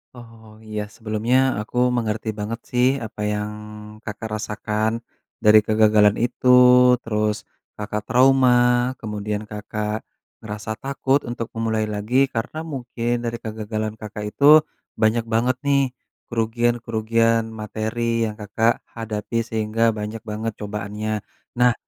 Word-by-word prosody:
Oh 115 -2 -14
iya 105 -1 -4
sebelumnya 110 +2 0 0.2
aku 110 +3 -7 0.2
mengerti 110 -1 -2
banget 115 +3 -3
sih 125 +1 +3 0.2
apa 105 -1 -8
yang 105 0 -3 0.5
Kakak 110 0 -6
rasakan 110 +2 -2 0.4
dari 105 0 +8
kegagalan 105 -1 +4
itu 125 +1 -4 0.6
terus 105 -1 0 0.4
Kakak 105 0 -3
trauma 130 0 +5 0.5
kemudian 105 -1 -4
Kakak 105 +1 -4 0.4
ngerasa 105 0 -6
takut 140 +1 +1
untuk 120 -1 -4
memulai 110 -1 0
lagi 105 +6 +1
karena 115 +7 -3
mungkin 120 -4 -3
dari 120 0 -3
kegagalan 110 0 -4
Kakak 105 0 -6
itu 150 +2 +7 0.3
banyak 115 +1 +1
banget 120 +3 +2
nih 140 -3 +1 0.3
kerugian-kerugian 115 -1 +1 0.2
materi 115 +2 -1
yang 110 - -3
Kakak 110 +3 +1 0.2
hadapi 115 0 -3
sehingga 110 +1 +1
banyak 105 +1 -5
banget 110 0 -4
cobaannya. 105 +1 -4 0.4
Nah, 125 -1 +5
110 Hz, 120 wpm, -22 LUFS, 105-120 Hz, 0.6 s, dari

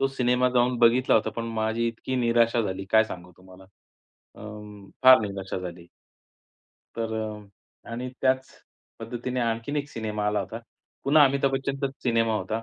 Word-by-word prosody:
तो 135 - +3
सिनेमा 125 -1 +1
जाऊन 125 0 +3
बघितला 120 +2 +4
होता. 110 - +2
पण 115 - -5 0.2
माझी 110 +2 0
इतकी 125 +3 -4
निराशा 115 -1 +2
झाली 95 -1 -4
काय 110 0 +6
सांगू 90 -3 -9
तुम्हाला 95 0 -16 0.7
अ, - - -15 0.6
फार 130 0 +10
निराशा 100 -2 -4
झाली. 85 -1 -8 1.1
तर 115 -1 -3
अ, 105 -2 -6 0.4
आणि 125 +2 -4
त्याच 130 0 +1 0.5
पद्धतीने 125 +2 -4
आणखीन 115 +5 -2
एक 145 0 -2
सिनेमा 105 -2 -3
आला 105 -1 +1
होता. 105 +4 -6 0.5
पुन्हा 145 +1 +6
अमिताभ 135 0 +1
बच्चनचाच 135 0 -2
सिनेमा 115 -2 +1
होता. 110 +1 -3
115 Hz, 150 wpm, -26 LUFS, 105-130 Hz, 1.1 s, फार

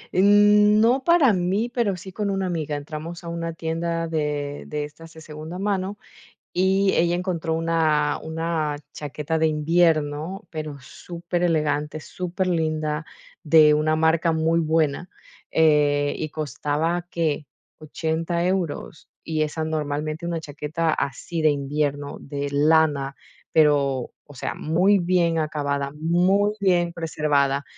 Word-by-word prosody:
Eh, 185 - +4
no 210 +4 +5
para 310 -7 +5
mí, 190 +6 0
pero, 230 -7 0
sí 190 +2 -9
con 205 +2 -2
una 195 -1 -1
amiga, 160 -5 -2
entramos 155 +4 -7
a 170 - -6
una 165 0 -4
tienda 165 +1 -2
de 150 -2 -2
de 150 0 -3
estas 155 +3 -11
de 160 - -11
segunda 155 +2 -8
mano, 195 0 -2 0.6
y 190 +2 +2
ella 170 +1 +2
encontró 175 -3 -2
una 160 -3 +1
una 160 -1 -2 0.2
chaqueta 150 +2 -3
de 160 - +3
invierno, 155 +2 +1
pero, 155 -3 -6
superelegante, 160 -1 -2
superlinda, 160 -4 -2 0.4
de 155 -2 +6
una 155 +1 +2
marca 160 +1 +2
muy 160 +1 +1
buena, 160 +1 0 0.4
eh, 145 -2 +3
y 155 - -3
costaba, 155 +4 -2
¿qué?, 155 -4 -1 0.3
80€ 160 +2 -2
euros. 180 -4 -3
Y 155 -1 -1
esa, 155 +1 -2
normalmente, 155 +1 -3
una 170 -1 -2
chaqueta 150 +2 -2
así 155 +4 -3
de 155 -1 +4
invierno, 145 0 -2
de 140 0 -4
lana, 145 -1 +2 0.4
pero, 140 -5 +2 0.2
o 145 - -13
sea, 125 - -4
muy 180 +6 +2
bien 175 -2 +1
acabada, 145 -2 -2
muy 180 +6 +2
bien 175 -3 +2
preservada. 145 -4 0
160 Hz, 130 wpm, -23 LUFS, 150-175 Hz, 0.6 s, de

